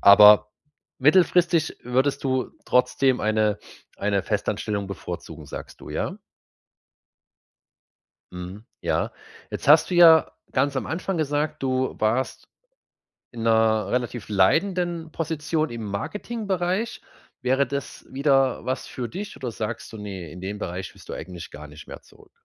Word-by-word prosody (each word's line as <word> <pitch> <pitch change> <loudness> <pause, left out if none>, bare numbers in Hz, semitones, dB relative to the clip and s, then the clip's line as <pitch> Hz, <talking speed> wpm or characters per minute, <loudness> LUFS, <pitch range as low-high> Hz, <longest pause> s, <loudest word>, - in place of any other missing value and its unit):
aber 105 +1 +8 0.5
mittelfristig 170 +2 +4
würdest 130 +4 0
du 130 -1 0
trotzdem 125 +1 +2
eine 110 -1 +1 0.4
eine 100 -1 0
Festanstellung 100 -2 -2
bevorzugen, 85 -4 -7
sagst - - -9
du, - - -9
ja? - - -2 2.2
Mhm, 90 +4 -8 0.2
ja. - - 0 0.4
Jetzt - - -6
hast 150 +3 +7
du 180 - -1
ja 165 -2 +7 0.2
ganz 140 +2 +1
am 130 - -1
Anfang 185 +2 -2
gesagt, 150 0 -1
du 130 0 0
warst 115 +5 0 0.8
in 115 - -7
'ner 110 -2 +3
relativ 120 -3 -2
leitenden 165 - +1
Position 160 0 -1
im 115 -1 -6
Marketingbereich. 190 - -2 0.4
Wäre 130 +2 +2
das 140 +2 -6
wieder 135 -1 +2
was 130 +1 -2
für 120 -2 -5
dich 200 +3 -6
oder 125 -3 -5
sagst 110 +1 -5
du, - - -7
ne, 95 -5 -7
in 90 - -10
den 100 +2 -5
Bereich 90 -2 -5
willst - - -17
du - - -4
eigentlich 90 -3 -8
gar 75 +1 -9
nicht 75 +1 -13
mehr - - -9
zurück? - - -21
125 Hz, 135 wpm, -24 LUFS, 105-155 Hz, 2.2 s, aber